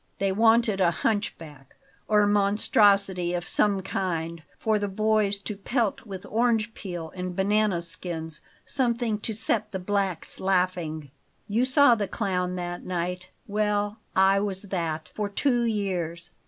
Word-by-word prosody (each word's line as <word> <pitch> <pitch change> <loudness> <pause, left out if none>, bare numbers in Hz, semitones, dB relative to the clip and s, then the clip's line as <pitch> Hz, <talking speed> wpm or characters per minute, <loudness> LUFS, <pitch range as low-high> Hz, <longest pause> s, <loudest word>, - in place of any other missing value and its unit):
"They 195 -1 0
wanted 225 0 +3
a 175 - +5
hunchback, 165 - -3 0.3
or 210 -1 +4
monstrosity 200 -3 +3
of 175 0 -4
some 200 -2 +2
kind; 170 -4 -3 0.2
for 215 -1 +1
the 205 - -1
boys 215 0 +1
to 210 - -5
pelt 230 +2 -1
with 190 -2 -7
orange 225 -1 +1
peel 175 -7 -7
and 180 -1 -4
banana 200 -2 +1
skins 165 -2 0 0.2
something 235 -4 0
to 220 0 -2
set 215 0 -1
the 190 - -3
blacks 190 -2 -2
laughing 180 -6 -1 0.4
You 225 +5 +1
saw 275 -1 +6
the 210 -3 -1
clown 180 -4 -2
that 175 -1 -5
night 180 0 -3 0.2
well, 210 0 -1 0.2
I 195 +1 +5
was 195 -1 -3
that 160 -3 -2
for 210 -1 -2
two 240 +3 +1
years. 185 -6 -2
195 Hz, 140 wpm, -26 LUFS, 180-215 Hz, 0.4 s, saw